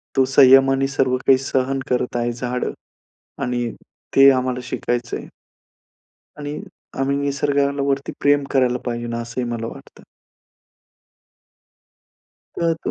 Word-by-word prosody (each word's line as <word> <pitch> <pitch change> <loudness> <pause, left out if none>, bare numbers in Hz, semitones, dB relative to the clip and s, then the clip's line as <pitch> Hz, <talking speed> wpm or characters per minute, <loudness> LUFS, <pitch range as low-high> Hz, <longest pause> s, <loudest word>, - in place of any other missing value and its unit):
तो 135 - +4
संयमाने 135 0 +5
सर्व 130 -1 +1
काही 135 -1 +7
सहन 135 0 -1
करत 125 -1 -1
आहे. 120 0 0
झाडं 125 +1 -3 0.7
आणि 120 -1 -1 0.5
ते 135 0 +9
आम्हाला 130 -1 0
शिकायचं 120 -1 -3
आहे. - - -8 1.1
आणि 145 0 -5 0.4
आम्ही 140 +1 +1
निसर्गावरती 140 0 0
प्रेम 145 0 +3
करायला 125 -2 +2
पाहिजे, 120 -1 -3
असं 115 +1 -5
ही - - -1
मला 115 -1 -3
वाटतं. - - -12 2.5
तर 165 -1 0
135 Hz, 110 wpm, -21 LUFS, 125-140 Hz, 2.5 s, ते